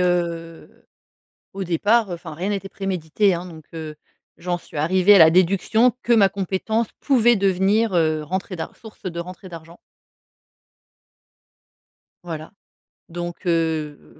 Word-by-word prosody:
heu, 170 -2 -2 0.7
au 195 0 -4
départ, 205 +6 +2
enfin, 170 -2 -7
rien 180 +6 -3
n'était 195 -1 -3
prémédité, 195 0 0
hein. 175 +1 -4
Donc, 160 -3 -11
heu, 155 -2 -7 0.4
j'en 175 0 -2
suis 170 - -12
arrivée 185 +6 +4
à - - +8
la 160 -3 +8
déduction 195 +7 +3
que 240 - +3
ma 205 -4 +5
compétence 200 +4 -1
pouvait 240 -4 +4
devenir, 195 +2 +2
heu, 155 -2 +2
rentrée 185 +4 -4
d'ar 160 -2 -6
source 220 -2 -15
de 170 -2 -4
rentrée 185 +2 -8
d'argent. 165 0 -11 2.5
Voilà 160 -2 -7 0.6
donc, 175 +2 -6
heu 160 -3 -2
180 Hz, 130 wpm, -22 LUFS, 165-195 Hz, 2.5 s, à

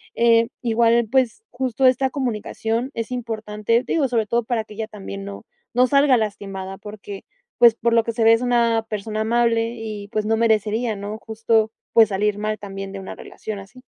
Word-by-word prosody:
Eh, 230 0 +4
igual, 235 0 +3
pues, 260 - +1
justo 260 0 -1
esta 260 +1 +4
comunicación 235 -1 -2
es 230 +1 -4
importante, 225 -1 -1
digo, 290 -1 +1
sobre 235 -3 0
todo 235 +2 +1
para 225 -1 -1
que 215 -1 -13
ella 220 0 -4
también 100 - -8
no, 100 0 -8 0.3
no 250 +1 +5
salga 280 0 +4
lastimada 195 -3 -4
porque, 205 -1 -9 0.3
pues, 235 -2 +7
por 235 0 0
lo 230 -1 +4
que 230 - -1
se 230 0 0
ve 225 - +7
es 230 - +2
una 235 -2 +2
persona 215 +1 -3
amable 230 0 +1
y, 215 -3 -6
pues, 215 -1 -2
no 220 +1 +1
merecería, 220 0 +1
¿no? 205 +2 -6
Justo, 220 0 +1 0.2
pues, 225 -1 +7
salir 205 +1 0
mal 215 +1 -2
también 195 -1 -7
de 195 - -6
una 190 - -8
relación 215 -2 -7
así. 215 +6 -13
225 Hz, 190 wpm, -22 LUFS, 210-235 Hz, 0.3 s, pues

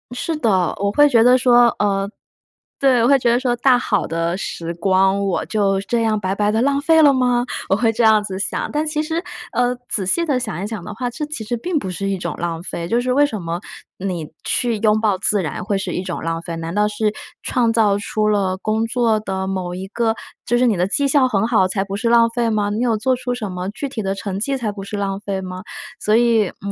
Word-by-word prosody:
是 325 +6 -2
的， 190 - +1
我 200 0 0
会 290 +7 +5
觉 235 -5 +4
得 250 +2 +6
说， 245 -1 +5
呃， 200 -1 0 0.7
对， 260 -4 +4
我 - - +4
会 275 +1 +5
觉 240 - +1
得 240 - +3
说 250 -2 0
大 250 +1 +4
好 215 -4 0
的 165 +1 -1
时 170 -3 -5
光， 190 +3 +2
我 195 -2 -1
就 200 -3 +1
这 230 +4 -1
样 220 -2 +1
白 190 -1 -1
白 205 +1 +1
地 220 - +1
浪 280 +1 +1
费 325 +1 +4
了 285 -2 +6
吗？ 250 -2 +2 0.2
我 195 - +4
会 225 +2 +2
这 235 +2 0
样 220 -1 +5
子 190 -2 -5
想。 200 - -2
但 300 +1 0
其 305 0 -1
实， 325 +2 -2 0.3
呃， 245 0 +1
仔 190 -4 -2
细 335 - +1
地 280 -5 +1
想 195 -7 -4
一 - - -2
想 210 -4 -5
的 210 - -7
话， 245 +2 -3
这 270 - -5
其 300 -7 -5
实 225 +3 -2
并 345 +7 -2
不 190 -10 -3
是 195 +2 -3
一 195 - -1
种 - - -4
浪 165 -1 -3
费， 170 -2 -5
就 235 - +1
是 250 +1 0
为 285 +3 +4
什 255 -8 -1
么 170 0 -4 0.4
你 180 -4 -3 0.2
去 235 -2 0
拥 215 0 +2
抱 215 -3 +2
自 205 0 +1
然 155 - -4
会 200 +1 -1
是 195 - -4
一 - - -2
种 185 -2 -4
浪 165 0 -2
费， 170 0 -6
难 165 0 -5
道 210 +1 +2
是 210 0 -1 0.3
创 235 -2 +1
造 220 -3 +3
出 215 +1 -1
了 195 -3 +1
工 215 +3 -1
作 230 -2 +1
的 190 -2 -3
某 185 -2 -3
一 185 +1 -5
个 225 +1 0 0.3
就 240 - +1
是 250 - +3
你 230 -4 +3
的 180 +1 +1
绩 280 +7 +1
效 270 -1 +4
很 210 -4 +1
好， 220 -6 +3
才 195 +1 -1
不 195 0 -5
是 230 +3 -1
浪 235 0 +5
费 235 -1 0
吗？ 210 -2 0
你 210 - -2
有 230 -3 +1
做 255 +5 +1
出 245 0 -3
什 215 -5 -5
么 180 +1 -4
具 220 +7 -5
体 255 -5 -5
的 195 -1 -2
成 195 -1 -4
绩 270 +6 -1
才 225 -5 -2
不 200 -1 -8
是 205 +1 -5
浪 195 -1 -2
费 200 -2 -3
吗？ 185 -1 -6 0.4
所 210 - +2
以， 230 -3 +3 0.2
嗯， 200 - -2
215 Hz, 275 characters per minute, -20 LUFS, 195-245 Hz, 0.7 s, 得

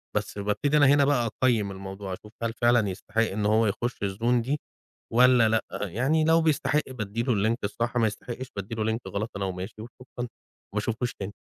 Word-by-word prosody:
بس - - -2
بابتدي 105 +9 +1
أنا 145 -2 +6
هنا 140 0 +5
بقى 125 -5 +2
أقيِّم 110 -6 +3
الموضوع، 95 0 -6
أشوف 105 +3 -10
هل 115 -1 -1
فعلًا 120 -3 +3
يستحق 105 +4 -2
إن 105 -2 0
هو 110 +2 +4
يخش 120 +5 -2
الzone 115 +5 +1
دي 140 +6 -1 0.5
والّا 125 -2 +6
لأ. 110 0 +2
آآ، - - -3
يعني 135 - +1
لو 165 +1 +5
بيستحق 150 -1 +2
بادي 115 -2 -3
له 125 - +1
الlink 110 +3 +2
الصح، 115 +4 -2
ما 115 -2 +4
يستحقش 120 +4 -6
بادي 100 +3 -5
له 110 0 0
link 115 - -2
غلط 105 +3 -3
أنا 100 - -2
وماشي، 95 +3 -5
وشكرًا، 120 +3 -12
وما 120 - -1 0.5
باشوفوش 115 +3 -1
تاني 100 0 -6
115 Hz, 200 wpm, -27 LUFS, 105-125 Hz, 0.5 s, أنا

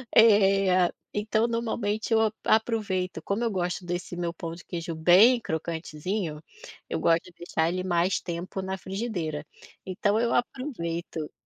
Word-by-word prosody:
Eh, 195 -4 +5 0.2
então 215 +2 +1
normalmente 225 -2 -1
eu 220 - +5
ap 220 -1 +2
aproveito, 200 -7 +1
como 200 +6 -1
eu 230 - +1
gosto 180 -1 -2
desse 175 0 -4
meu 170 -1 -2
pão 165 -2 -6
de 170 - -12
queijo 170 -1 -5
bem 190 +10 +6
crocantezinho, 160 +1 -3 0.5
eu - - -1
gosto 165 0 +3
de 180 - -13
deixar 165 -1 -1
ele 185 +1 -2
mais 175 +1 +1
tempo 175 +2 -4
na 190 0 -3
frigideira, 185 -7 -4 0.4
então 200 +3 +1
eu 235 0 +1
aproveito 170 - -3
185 Hz, 145 wpm, -27 LUFS, 170-215 Hz, 0.5 s, bem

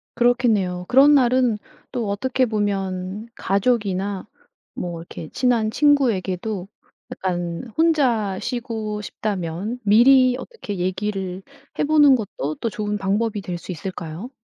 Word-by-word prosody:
그렇겠네요. 220 -7 +2
그런 275 +3 +7
날은 250 -4 +3 0.3
또 235 -5 -2
어떻게 255 +5 0
보면 200 -1 -2
가족이나 200 -2 0 0.5
뭐 175 -2 -5
이렇게 165 -1 -9
친한 235 -4 +1
친구에게도 220 -9 +1 0.4
약간 175 +3 -3
혼자 255 - +2
쉬고 225 -4 -3
싶다면 200 +1 -4
미리 250 +4 +6
어떻게 265 - -7
얘기를 185 0 -2 0.4
해 - - +2
보는 290 -3 +6
것도 155 - -4
또 230 - -2
좋은 210 -2 -3
방법이 205 +2 0
될 180 -2 -5
수 180 - -7
있을까요? 180 - -6
210 Hz, 265 characters per minute, -22 LUFS, 185-245 Hz, 0.5 s, 그런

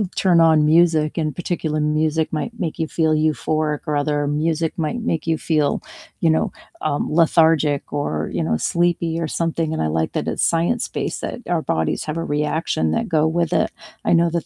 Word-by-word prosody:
turn 175 -3 +4
on 160 -2 +5
music, 160 -1 +3
and 155 -2 -2
particular 165 -3 -2
music 155 +1 0
might 230 +9 -4
make 170 -6 -3
you 160 - 0
feel 160 0 +1
euphoric, 155 -1 0
or 150 - -1
other 145 0 0
music 155 +2 0
might 165 +8 -2
make 165 -10 -2
you 160 -1 +2
feel, 150 -3 0 0.4
you 165 - +3
know, 160 - +1 0.3
um, 150 0 -1
lethargic, 160 -3 +3
or, 80 - -2
you - - -1
know, 80 - 0
sleepy, 170 - 0
or 165 - -1
something, 165 0 -1
and 160 - -1
I - - +1
like 80 +1 -1
that - - -2
it's - - -1
science 170 +8 +1
based, - - -4
that - - -5
our 175 -2 0
bodies 80 - -1
have 155 +1 -3
a 165 - -2
reaction 150 - -1
that 80 - -1
go 160 -2 +2
with 170 0 0
it. - - +2 0.3
I - - +2
know 170 0 +3
that 170 -1 -2
160 Hz, 200 wpm, -21 LUFS, 150-165 Hz, 0.4 s, on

